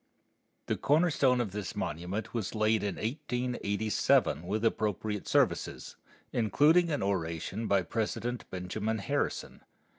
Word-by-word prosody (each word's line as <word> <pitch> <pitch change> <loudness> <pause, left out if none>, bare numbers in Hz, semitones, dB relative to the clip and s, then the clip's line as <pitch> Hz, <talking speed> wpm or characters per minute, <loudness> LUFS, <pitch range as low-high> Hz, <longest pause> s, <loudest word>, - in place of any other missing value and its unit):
The - - -1
corner 165 +4 +3
stone 130 -3 +3
of 115 -5 -1
this 100 -3 -5
monument 90 +7 -3
was 115 -3 -3
laid 110 0 +2
in 100 -2 -2
1887 115 - 0
with 110 +4 -1
appropriate 105 -2 -1
services, - - 0 0.4
including 150 +9 +4
an 145 -9 -1
oration 95 +3 -2
by 100 -2 +3
President 115 +5 -3
Benjamin 105 +5 -2
Harrison. 100 - -2
110 Hz, 120 wpm, -30 LUFS, 100-125 Hz, 0.4 s, including